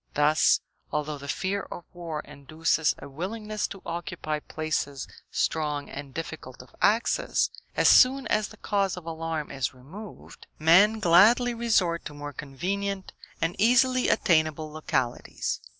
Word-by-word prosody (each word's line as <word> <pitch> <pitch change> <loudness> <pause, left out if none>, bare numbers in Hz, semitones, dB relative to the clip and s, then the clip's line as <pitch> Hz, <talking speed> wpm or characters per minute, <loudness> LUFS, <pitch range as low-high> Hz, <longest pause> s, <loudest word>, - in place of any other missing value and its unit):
Thus, 150 +1 +4 0.3
although 150 -1 -2
the 140 - -9
fear 195 +6 -1
of 175 - -8
war 165 -3 -5
induces 150 +2 -1
a - - -10
willingness 210 +8 -4
to 195 - -10
occupy 170 -3 -4
places 150 -3 -3 0.2
strong 150 -2 -1
and 140 -1 -7
difficult 150 -5 -7
of 125 - -21
access, 225 +3 +2 0.3
as - - +4
soon 265 +1 +6
as 215 -1 +1
the 215 - -15
cause 195 -4 0
of 175 - -9
alarm 165 -2 -4
is 135 -2 -2
removed, 180 +12 -12
men 190 +8 +5
gladly 215 +8 +5
resort 215 -8 +1
to 150 - -7
more 145 0 -7
convenient 190 +8 -4 0.3
and 165 +1 0
easily 250 +2 +4
attainable 155 -2 +2
localities. 135 -5 -2
165 Hz, 135 wpm, -27 LUFS, 150-200 Hz, 0.3 s, soon